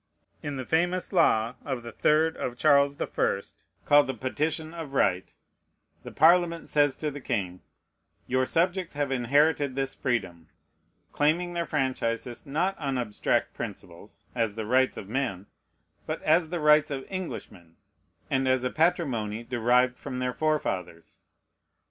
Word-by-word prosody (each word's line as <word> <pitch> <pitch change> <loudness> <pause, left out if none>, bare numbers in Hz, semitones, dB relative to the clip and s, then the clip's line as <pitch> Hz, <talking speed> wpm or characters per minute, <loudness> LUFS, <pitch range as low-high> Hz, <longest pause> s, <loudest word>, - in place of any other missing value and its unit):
In 145 -1 -4
the 130 -1 -5
famous 175 +6 0
law 115 -10 +3
of 130 -4 -4
the 115 - -7
3rd 160 +1 +2
of 120 -1 -4
Charles 140 0 +4
the - - -1
First, - - -3 0.2
called 145 0 +5
the 135 - -3
Petition 155 +6 -2
of 160 -5 -7
Right, 95 -7 +1 0.7
the - - -9
Parliament 170 +1 +3
says 145 -2 +2
to 150 +1 -3
the 145 0 -8
king, 95 -8 -3 0.6
"Your 130 0 0
subjects 180 0 0
have 145 -2 -1
inherited 140 +2 +2
this 135 0 -2
freedom": 95 -10 -3 0.6
claiming 170 +4 +1
their 170 -1 -2
franchises, 125 -4 -2
not 175 +8 0
on 135 -4 -2
abstract 110 -4 -1
principles, - - -9
"as 115 -4 -1
the 110 -1 -4
rights 130 +3 +2
of 95 - -7
men," 115 -5 -2 0.6
but - - -3
as 160 +1 +3
the 175 0 -3
rights 150 0 +5
of 135 -2 -4
Englishmen, 105 - -7 0.5
and 135 -1 0
as 130 -1 +2
a 125 - -1
patrimony 125 -10 0
derived 125 +1 +2
from 125 - -6
their 125 0 -1
forefathers. 95 - -2
135 Hz, 150 wpm, -27 LUFS, 120-155 Hz, 0.7 s, called